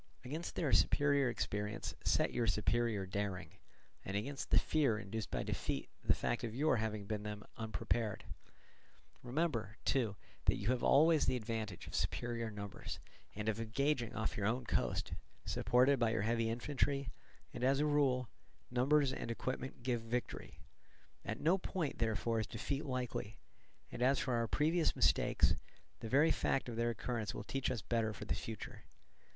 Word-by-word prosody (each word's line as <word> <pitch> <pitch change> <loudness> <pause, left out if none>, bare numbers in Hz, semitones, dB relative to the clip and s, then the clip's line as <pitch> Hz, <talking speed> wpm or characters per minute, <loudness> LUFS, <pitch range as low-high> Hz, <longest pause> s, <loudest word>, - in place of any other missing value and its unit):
Against 155 +7 -4
their 150 -6 0
superior 140 -2 +4
experience 105 -1 -2
set - - +2
your 120 -2 +1
superior 105 0 +1
daring, 95 -3 -3 0.5
and 95 +1 -2
against 135 +7 -4
the - - +5
fear 140 -8 +3
induced 110 +1 -4
by - - -1
defeat - - -2
the - - +4
fact 120 +1 -1
of 115 -1 -3
your 145 -1 +3
having 110 -2 -2
been 105 0 -2
then 105 0 -5
unprepared; 110 0 -1 1.0
remember, 120 - -1
too, 115 -7 +2 0.3
that - - +4
you - - -2
have 125 -1 +2
always 155 +2 +5
the - - +3
advantage 110 -5 -4
of - - -10
superior 115 -1 -1
numbers, 100 -2 -6 0.4
and 105 +1 -4
of 110 0 +1
engaging 120 +1 0
off 110 - -1
your 100 -1 0
own 120 +3 0
coast, 65 - 0 0.3
supported 130 +2 +3
by 115 -2 +3
your 110 -2 0
heavy 115 0 +1
infantry; 140 +3 0 0.4
and 120 - -5
as 135 +2 +4
a 150 - +3
rule, 135 -4 +2 0.4
numbers 135 +2 +3
and - - -4
equipment 130 +1 -4
give 120 -2 0
victory. 120 +1 -4 0.7
At 110 +2 -3
no 180 +5 +3
point, 175 -5 -2
therefore, 115 0 +1
is 110 - -1
defeat 135 +5 -3
likely; 125 -5 -3 0.5
and - - -6
as 130 +2 +4
for 130 - 0
our 115 -1 +1
previous 160 +6 +2
mistakes, - - +4 0.5
the 115 - -5
very 145 +6 +5
fact 135 - +1
of 120 - -4
their 120 +1 +1
occurrence 115 -2 -2
will - - -4
teach 135 +5 -1
us 115 -4 -2
better 115 -2 0
for 105 - -7
the - - 0
future. 110 -2 -6
120 Hz, 165 wpm, -36 LUFS, 110-135 Hz, 1.0 s, the